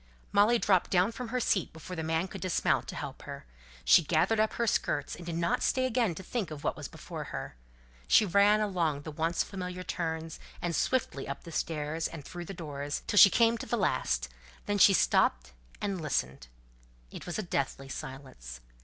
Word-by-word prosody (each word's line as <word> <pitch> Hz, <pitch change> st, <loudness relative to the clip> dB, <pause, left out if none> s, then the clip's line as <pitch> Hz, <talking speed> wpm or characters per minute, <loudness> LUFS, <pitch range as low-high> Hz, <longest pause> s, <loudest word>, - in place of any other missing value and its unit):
Molly 210 Hz, +4 st, +5 dB
dropped 190 Hz, -5 st, +2 dB
down 185 Hz, +4 st, +3 dB
from 245 Hz, +1 st, -6 dB
her 250 Hz, +2 st, -1 dB
seat 195 Hz, -6 st, +1 dB
before 160 Hz, +3 st, -8 dB
the 160 Hz, -, -3 dB
man 160 Hz, +3 st, 0 dB
could -, -, -9 dB
dismount 185 Hz, -3 st, +1 dB
to -, -, -6 dB
help -, -, -6 dB
her. -, -, -8 dB, 0.4 s
She -, -, +7 dB
gathered 170 Hz, +8 st, +2 dB
up 215 Hz, 0 st, +2 dB
her 235 Hz, -, 0 dB
skirts 145 Hz, -9 st, 0 dB
and 175 Hz, 0 st, -11 dB
did 170 Hz, -, -3 dB
not 170 Hz, 0 st, 0 dB
stay 260 Hz, 0 st, +1 dB
again 235 Hz, -8 st, +1 dB
to 190 Hz, -, -8 dB
think 210 Hz, -1 st, -3 dB
of 150 Hz, -2 st, -8 dB
what -, -, 0 dB
was -, -, -6 dB
before -, -, -8 dB
her. -, -, -6 dB, 0.5 s
She 215 Hz, -, +6 dB
ran 200 Hz, +3 st, +4 dB
along 170 Hz, -8 st, 0 dB
the 155 Hz, -, -6 dB
once 165 Hz, +3 st, 0 dB
familiar 180 Hz, -2 st, -6 dB
turns, 160 Hz, -2 st, -4 dB, 0.2 s
and 170 Hz, -1 st, -2 dB
swiftly 235 Hz, -, 0 dB
up 140 Hz, -, -6 dB
the 170 Hz, -, -10 dB
stairs, 160 Hz, 0 st, -2 dB
and 150 Hz, -4 st, -9 dB
through 175 Hz, -1 st, -7 dB
the 195 Hz, -, -7 dB
doors, 145 Hz, -3 st, -5 dB
till 205 Hz, -, -2 dB
she 200 Hz, -, +11 dB
came 230 Hz, +2 st, +3 dB
to -, -, -6 dB
the 240 Hz, -, 0 dB
last; 130 Hz, -, 0 dB, 0.4 s
then 205 Hz, 0 st, 0 dB
she 195 Hz, -, +8 dB
stopped 65 Hz, -, +2 dB, 0.3 s
and 195 Hz, -4 st, -2 dB
listened. 65 Hz, -, -2 dB, 0.6 s
It -, -, -9 dB
was 175 Hz, -, -3 dB
a 215 Hz, -, -2 dB
deathly 135 Hz, -5 st, -2 dB
silence. 130 Hz, -, -8 dB
170 Hz, 200 wpm, -30 LUFS, 150-205 Hz, 0.6 s, she